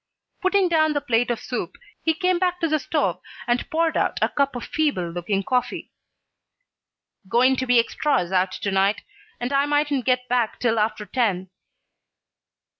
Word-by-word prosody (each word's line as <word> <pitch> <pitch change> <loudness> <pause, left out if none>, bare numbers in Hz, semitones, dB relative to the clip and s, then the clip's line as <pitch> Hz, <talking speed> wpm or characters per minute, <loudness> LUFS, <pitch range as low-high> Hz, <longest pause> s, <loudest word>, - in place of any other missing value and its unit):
Putting 375 0 +3
down 315 -2 +2
the 290 - +1
plate 245 -3 +1
of 235 -2 -1
soup, 245 - -5 0.3
he 320 -1 +1
came 365 +1 +1
back 360 -1 0
to 335 - +1
the 310 -1 +1
stove - - -1 0.2
and 240 -1 -1
poured 325 0 +1
out - - 0
a - - +2
cup 280 -2 0
of 245 - -5
feeble 280 - -1
looking 185 +3 -2
coffee. 250 +4 -2 1.4
"Goin' 255 +4 +4
to 260 - -2
be 245 0 +4
extras 235 - 0
out 185 0 +2
to 200 - -3
night 195 +2 +1 0.4
and 245 +3 -3
I 280 +1 +2
mightn't 290 -3 +1
get 250 -1 +1
back 240 -2 0
till 230 -2 +1
after 215 0 -1
ten." 190 -5 -1
250 Hz, 170 wpm, -23 LUFS, 215-300 Hz, 1.4 s, Goin